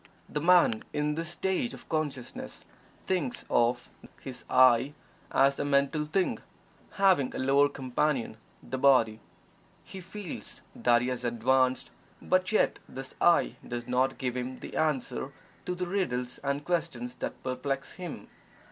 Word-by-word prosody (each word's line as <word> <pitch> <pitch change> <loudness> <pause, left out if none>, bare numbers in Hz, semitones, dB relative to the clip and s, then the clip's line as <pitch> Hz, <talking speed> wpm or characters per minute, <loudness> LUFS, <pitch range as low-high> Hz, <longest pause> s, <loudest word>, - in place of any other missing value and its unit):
The 150 - -3
man 170 -9 +5
in 150 0 0
this 165 +1 -4
stage 190 +6 -1
of - - -15
consciousness 150 -6 -4 0.4
thinks 170 -10 -1
of 120 +1 +2 0.3
his 130 -2 -8
"I" 130 +2 +5 0.4
as 140 +1 +3
a - - +1
mental 145 +2 +1
thing, 180 +5 0 0.5
having 190 -10 +3
a - - -2
lower 140 +2 +4
companion, 130 -3 -1 0.3
the 130 - -4
body. 125 -5 +4 0.6
He 190 - -9
feels 190 0 -8
that 120 0 +3
he 125 - -1
has 125 -1 -3
advanced, 130 +2 +1 0.3
but 185 +1 +1
yet 215 - +2
his 135 0 -7
"I" 175 -1 +4
does 120 -1 -4
not 130 +2 +1
give 125 -2 -2
him 125 +1 -4
the - - -8
answer 135 -3 -1 0.3
to 180 - -1
the 180 0 -2
riddles 125 -10 -2
and 140 +1 -1
questions 155 -9 -2
that - - -5
perplex 135 +1 -3
him. 180 -3 -8
135 Hz, 145 wpm, -29 LUFS, 125-165 Hz, 0.6 s, man